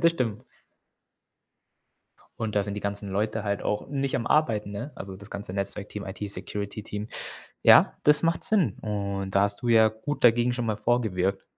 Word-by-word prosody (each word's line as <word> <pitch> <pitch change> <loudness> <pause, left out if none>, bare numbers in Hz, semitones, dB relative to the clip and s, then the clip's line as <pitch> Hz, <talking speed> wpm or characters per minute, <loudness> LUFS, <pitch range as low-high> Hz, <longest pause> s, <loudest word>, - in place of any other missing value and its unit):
Das 165 -1 +5
stimmt. 115 -9 -2 2.0
Und 110 -2 -3
da 100 - +3
sind 100 0 -4
die 105 - -4
ganzen 100 0 -3
Leute 105 +2 -1
halt 100 0 -1
auch 105 - -2
nicht 140 -1 -2
am 115 - -1
Arbeiten, 110 -9 +2
ne? 120 +9 -6
Also, 95 -1 -7
das 100 +1 -11
ganze 100 -2 -5
Netzwerkteam, 100 +1 -4
IT-Security-Team. 105 +1 -4 0.5
Ja, - - +6
das 150 +1 +5
macht 165 +1 +1
Sinn. 205 -7 +2
Und 100 -2 -3
da 100 - +5
hast 100 +2 0
du 120 - -3
ja 110 -1 +6
gut 120 +7 -5
dagegen 120 +1 +5
schon 120 -1 -2
mal 110 -2 -1
vorgewirkt. 100 -6 0
105 Hz, 170 wpm, -26 LUFS, 100-120 Hz, 2.0 s, Ja